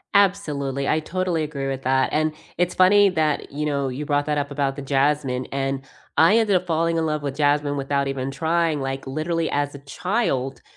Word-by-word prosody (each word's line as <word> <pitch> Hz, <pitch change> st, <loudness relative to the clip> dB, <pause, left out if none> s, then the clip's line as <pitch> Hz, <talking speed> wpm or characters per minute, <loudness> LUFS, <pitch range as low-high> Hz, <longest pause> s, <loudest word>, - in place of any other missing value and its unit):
Absolutely. 145 Hz, -9 st, +1 dB
I 155 Hz, -, +2 dB
totally 180 Hz, +1 st, -1 dB
agree 140 Hz, -2 st, -4 dB
with 135 Hz, -1 st, -3 dB
that, 130 Hz, +1 st, +2 dB
and 155 Hz, 0 st, +1 dB, 0.2 s
it's 180 Hz, 0 st, 0 dB
funny 200 Hz, +2 st, +6 dB
that 155 Hz, -5 st, -1 dB
you 150 Hz, +2 st, -3 dB
know, 140 Hz, -2 st, 0 dB
you 130 Hz, +4 st, -4 dB
brought 145 Hz, 0 st, 0 dB
that 150 Hz, -1 st, 0 dB
up 145 Hz, 0 st, -2 dB
about 140 Hz, -1 st, -1 dB
the 140 Hz, -, -6 dB
jasmine 135 Hz, -2 st, 0 dB
and 135 Hz, 0 st, -2 dB, 0.3 s
I 165 Hz, +9 st, +6 dB
ended 215 Hz, -4 st, +3 dB
up 180 Hz, 0 st, 0 dB
falling 165 Hz, 0 st, +1 dB
in 160 Hz, -1 st, +1 dB
love 150 Hz, -1 st, -2 dB
with 140 Hz, -1 st, -3 dB
jasmine 145 Hz, -1 st, +1 dB
without 140 Hz, 0 st, 0 dB
even 135 Hz, -1 st, -3 dB
trying, 160 Hz, +2 st, 0 dB
like 135 Hz, 0 st, -4 dB
literally 160 Hz, +4 st, -1 dB
as 145 Hz, 0 st, -1 dB
a 140 Hz, -, -9 dB
child. 140 Hz, -, -2 dB
145 Hz, 200 wpm, -23 LUFS, 135-165 Hz, 0.3 s, funny